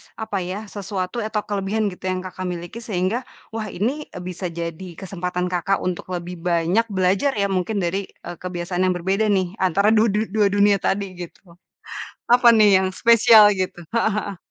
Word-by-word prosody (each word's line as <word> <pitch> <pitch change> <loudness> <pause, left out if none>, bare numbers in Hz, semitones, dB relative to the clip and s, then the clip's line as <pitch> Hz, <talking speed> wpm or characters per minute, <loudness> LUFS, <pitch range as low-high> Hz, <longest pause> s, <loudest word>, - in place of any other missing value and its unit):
apa 220 -3 -4
ya, 190 +4 -5
sesuatu 195 0 -4
atau 215 -1 -2
kelebihan 205 +1 -1
gitu 180 - -14
yang 185 0 -2
Kakak 185 0 -6
miliki 175 +5 -6
sehingga, 220 +2 -2 0.3
wah, 220 -1 -4
ini, 255 +11 -2
e 180 - -10
bisa 180 +1 -6
jadi 170 +2 -5
kesempatan 180 -1 -3
Kakak 180 +2 0
untuk 180 - -3
lebih 175 +1 -6
banyak 175 +5 +1
belajar 190 +9 +2
ya 200 -1 +1
mungkin 195 +2 -1
dari, 190 +3 -2
e - - -13
kebiasaan 180 0 -3
yang 185 - +2
berbeda 190 +5 0
nih 190 -3 +2
antara 190 +3 +3
du 220 +1 +5
du 210 0 +1
dua 210 -2 +4
dunia 200 0 +3
tadi, 200 +2 0 0.2
gitu. - - -28 0.9
Apa 245 0 +5
nih 205 -3 +6
yang 190 - 0
spesial 225 +1 +6
gitu? 185 -2 -3 0.2
Heeh 230 - +2 0.2
heeh. 195 - -8
195 Hz, 180 wpm, -22 LUFS, 180-215 Hz, 0.9 s, nih